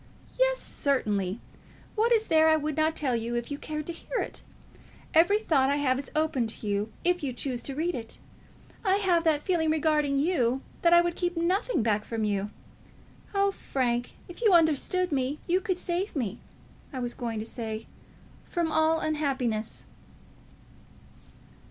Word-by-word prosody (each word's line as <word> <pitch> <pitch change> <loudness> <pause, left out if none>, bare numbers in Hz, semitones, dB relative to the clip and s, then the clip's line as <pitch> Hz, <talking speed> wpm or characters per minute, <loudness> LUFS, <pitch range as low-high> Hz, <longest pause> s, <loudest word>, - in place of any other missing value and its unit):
"Yes; - - +4
certainly. 210 - -1 0.5
What 455 +2 +2
is 445 -2 +4
there 315 -3 +4
that 315 - +6
I - - +4
would 305 -1 -2
not 315 +1 +2
tell 260 -5 0
you 235 +1 -2
if 240 +3 -3
you 285 - -3
cared 305 -1 -4
to 340 - -4
hear 480 - -5
it? - - -2 0.7
Every 345 +6 +5
thought 285 -11 +2
I 285 - +2
have 265 -3 +1
is 280 - -7
open 305 -6 +1
to 220 - -8
you 205 +1 -1
if 355 0 +2
you 280 -3 -2
choose 245 0 -3
to 275 - -4
read 335 +4 0
it. 225 -5 -6 0.7
I 385 -2 +3
have 365 -4 +2
that 305 -2 +2
feeling 335 -4 +1
regarding 300 -2 +2
you 270 -5 +1 0.2
that 340 - +4
I 345 0 +8
would 345 0 -1
keep 350 -1 -2
nothing 365 - +1
back 210 -2 +1
from 225 0 -3
you. 205 -1 0 0.9
Oh, 395 0 +3
Frank, 245 -8 -1
if 350 +5 -11
you 435 -5 +5
understood 340 +2 +3
me, 270 +1 0
you 365 +2 +2
could 375 -4 -1
save 360 +2 -2
me, 235 -9 -2 0.5
I 265 - -6
was 245 -1 -2
going 230 -2 -4
to 215 - -3
say 225 -2 -5 0.6
from 340 -3 -1
all 315 +1 +3
unhappiness." 265 -8 -1
305 Hz, 175 wpm, -28 LUFS, 245-345 Hz, 0.9 s, I